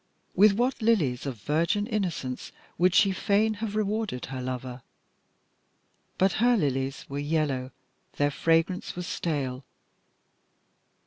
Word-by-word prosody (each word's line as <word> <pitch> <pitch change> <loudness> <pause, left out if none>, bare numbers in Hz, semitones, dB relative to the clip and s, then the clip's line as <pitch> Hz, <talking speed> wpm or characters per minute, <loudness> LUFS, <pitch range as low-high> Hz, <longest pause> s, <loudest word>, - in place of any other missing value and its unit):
With 200 +2 +6
what 245 +4 0
lilies 155 - +1
of 125 -5 -5
virgin 170 +7 +1
innocence 180 - -3 0.3
would 180 0 +4
she 200 -2 +5
fain 210 +3 +2
have 215 -2 -3
rewarded 215 - -1
her 130 -1 -6
lover! 125 0 -5 1.4
but 190 +1 +3
her 245 0 +5
lilies 135 -5 -1
were 140 +1 -4
yellow, 145 -4 -1 0.5
their 145 0 +1
fragrance 165 +5 +1
was 180 0 -4
stale. 135 -7 -3
165 Hz, 120 wpm, -27 LUFS, 135-205 Hz, 1.4 s, With